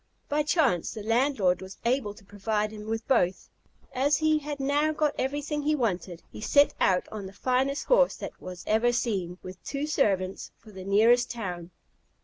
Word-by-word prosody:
By 295 +1 +2
chance 295 - +1
the 215 - -6
landlord 225 -5 +2
was 190 +1 -9
able 235 -4 0
to 205 - -17
provide 210 +1 -2
him 210 0 -9
with 225 0 -3
both. 190 -8 +1 0.4
As 280 +3 +2
he 310 -1 +2
had 295 -1 -6
now 290 +3 +1
got 300 -1 +1
everything 290 +3 -2
he 305 +1 +1
wanted, 185 - -2
he - - -9
set 285 +6 +4
out 180 -1 +2
on 205 -3 -6
the 190 - -11
finest 260 +6 0
horse - - +4
that - - -8
was 180 -1 -8
ever 225 +3 +3
seen, 190 -7 -1
with 185 0 -10
two 280 +1 -3
servants, 195 -11 0
for 215 - -16
the 190 -2 -9
nearest 225 +5 +4
town. 180 -7 -5
230 Hz, 180 wpm, -27 LUFS, 195-285 Hz, 0.4 s, set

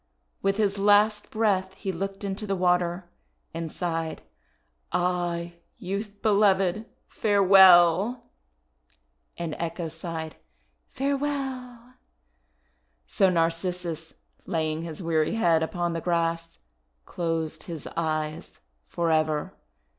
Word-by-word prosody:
With 195 0 +1
his 200 -2 +1
last 210 +1 +3
breath 190 -4 0
he 190 0 -4
looked 195 +3 -5
into 200 +2 -4
the 195 - 0
water 180 -1 +1 0.5
and 165 -1 -4
sighed, 165 -2 -3 0.7
"Ah, 175 -1 -1 0.3
Youth 200 +2 -5
Beloved, 200 -1 +3 0.2
farewell!' 195 +1 +5 1.1
And 170 -3 -4
Echo 170 0 -3
sighed, 160 -1 -6 0.5
"Farewell!" 265 -3 -3 1.1
So 190 - +2
Narcissus, 170 -1 -2 0.3
laying 155 -1 -1
his 165 +1 -7
weary 160 +3 +1
head 170 -7 +3
upon 175 +1 -2
the 165 - -3
grass, 165 -1 -1 0.5
closed 165 -2 -3
his 165 -5 -7
eyes 155 -2 -3 0.3
forever. 155 -3 0
175 Hz, 95 wpm, -26 LUFS, 165-200 Hz, 1.1 s, farewell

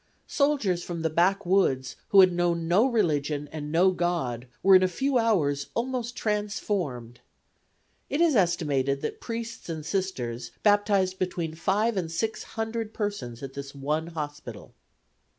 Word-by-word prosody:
Soldiers 275 - +1
from 170 -1 -5
the 160 - 0
backwoods 180 -7 +2
who 195 - +7
had 185 -1 +5
known 170 -1 0
no 200 +9 +4
religion 150 - 0
and 150 -1 -6
no 180 +4 +4
God 165 -10 -2 0.2
were 195 0 +7
in 185 - +7
a 185 - +4
few 265 +7 0
hours 150 -11 +1
almost 245 0 -2
transformed. 195 - -2 0.9
It 285 - -1
is 335 -4 +4
estimated 145 - +1
that - - -4
priests 230 -4 -6
and 160 -2 -5
Sisters 160 - -3
baptized 205 -3 +3
between 175 -3 -2
five 200 +6 0
and 165 -3 -2
six 220 +7 -2 0.2
hundred 225 0 -3
persons 140 - -4
at 135 -1 -6
this 140 0 -7
one 150 +4 -2
hospital. 150 -8 -7
175 Hz, 145 wpm, -27 LUFS, 150-210 Hz, 0.9 s, who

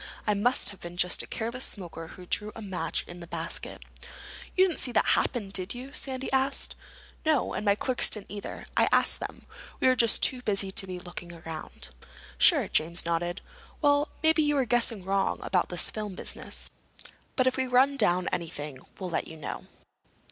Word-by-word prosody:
It 210 - +4
must 210 +3 +2
have 200 - -12
been 175 0 -8
just 180 0 +3
a - - -9
careless 235 +3 -3
smoker 170 -4 -5
who 180 +2 -11
threw 210 +4 -1
a 225 - -8
match 190 -3 -1
in 175 0 -9
the 170 - -9
basket." - - -5 0.7
"You 375 +1 +7
didn't 345 - -3
see 255 - +1
that - - +3
happen, 225 -6 +1
did 190 +2 +2
you?" 260 +3 -8
Sandy 265 -2 -2
asked. 270 +1 0 0.5
"No—and 310 -8 +1
my 200 -1 +4
clerks 255 +3 +3
didn't 210 -3 -4
either. 205 -1 -6
I - - +4
asked - - +4
them. - - -7 0.3
We - - +3
were 255 - +5
just 230 -2 +4
too 255 -2 +5
busy 195 -4 +1
to 195 - +5
be 180 -1 -5
looking 175 -1 -8
around." 160 - -6 0.5
"Sure." - - +6
James 170 +2 +1
nodded. 175 +2 -1 0.4
"Well, 290 0 +3
maybe 315 -2 +4
we're 275 -3 +2
guessing 230 -4 +1
wrong 195 +1 +1
about 185 -2 +1
this 175 - +2
film 210 -3 -5
business. - - -2 0.6
But 255 - +3
if 260 - +2
we 260 0 0
run 260 +3 +4
down 180 -8 +2
anything 150 -5 -4 0.2
we'll 185 -2 -5
let - - -1
you 160 - -9
know." 155 - -6
205 Hz, 185 wpm, -28 LUFS, 175-255 Hz, 0.7 s, You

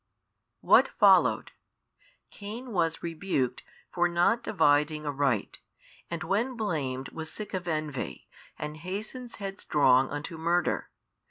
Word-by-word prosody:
What - - +6
followed? - - +4 0.8
Cain 225 +5 -8
was 165 -5 0
rebuked 160 -7 -1 0.3
for 175 -1 +2
not 175 +7 +2
dividing 150 -6 +2
aright, 140 -6 -1 0.5
and 170 0 -4
when 220 +9 0
blamed 140 - -2
was 160 -1 -6
sick 215 - -6
of 180 -2 -3
envy, 155 -4 -3 0.3
and 150 +1 -5
hastens 215 - -6
headstrong 145 -10 +2
unto 145 +3 -5
murder. 170 +2 0
165 Hz, 110 wpm, -28 LUFS, 145-195 Hz, 0.8 s, What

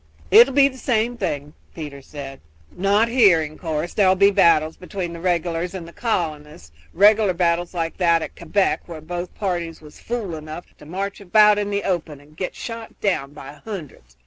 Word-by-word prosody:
"It 235 - +9
'll - - -5
be 275 0 +6
the 260 -1 -8
same 240 -1 0
thing," 150 -9 -4 0.2
Peter 145 -4 -7
said; 135 -1 -9 0.4
"not 200 +5 +2
here, 210 -9 +5
in 155 0 -8
course; 160 0 -3
there 195 -3 +4
'll 185 - +4
be 200 +1 +5
battles 160 -4 +3
between 180 -2 -5
the 170 - -8
regulars 175 0 -1
and 170 -3 -7
the 170 - -13
colonists, 150 - -3 0.2
regular 205 +1 +4
battles 175 0 0
like 165 -1 -3
that 170 -3 +3
at - - -8
Quebec, 190 +4 0
where 165 -2 -8
both 175 +3 -6
parties 175 -5 -3
was 150 -1 -15
fools 225 -7 -4
enough 155 +2 -9
to 150 - -14
march 195 +4 -4
about 210 +2 +5
in 205 0 -2
the 200 0 -1
open 165 -6 -2
and 145 +2 -20
get 180 +3 -4
shot 230 -1 -8
down 145 -9 -1
by 145 0 -11
hundreds. 150 - -9
175 Hz, 195 wpm, -22 LUFS, 155-200 Hz, 0.4 s, It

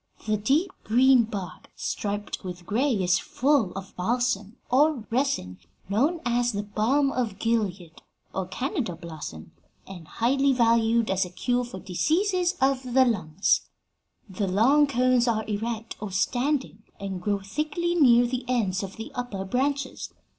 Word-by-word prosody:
The 215 0 +1
deep 280 - +1
green 250 +1 +5
bark, 195 -6 -7
striped 205 0 -4
with 180 -1 -7
gray, 250 +10 +1
is 180 -5 +2
full 270 -7 +1
of 195 0 -8
balsam, 225 +1 -1
or 280 -2 +3
resin, 230 - -1 0.3
known 290 - +1
as 240 0 +1
balm 215 +8 +1
of 230 -7 -2
Gilead 200 -7 -2 0.3
or - - -2
Canada 240 - -3
balsam, 160 - -8 0.3
and 175 -4 -10
highly 270 +4 +2
valued 230 -2 +3
as 190 +1 +2
a 180 - -6
cure 245 +7 -1
for 240 -5 -8
diseases 355 - +1
of 265 -1 +2
the 260 -1 +7
lungs. 195 -6 +1 0.6
The 195 0 -3
long 260 +11 +4
cones 255 -2 +2
are 220 -2 0
erect, 225 +2 -4
or 210 -2 -5
standing, 250 +4 -1 0.2
and 195 -2 -5
grow 205 +2 0
thickly 305 - -2
near 245 -8 +5
the 245 +1 -3
ends 210 -7 0
of 195 -1 -6
the 225 - -8
upper 230 -6 -4
branches. 270 +5 -2
230 Hz, 145 wpm, -26 LUFS, 195-265 Hz, 0.6 s, the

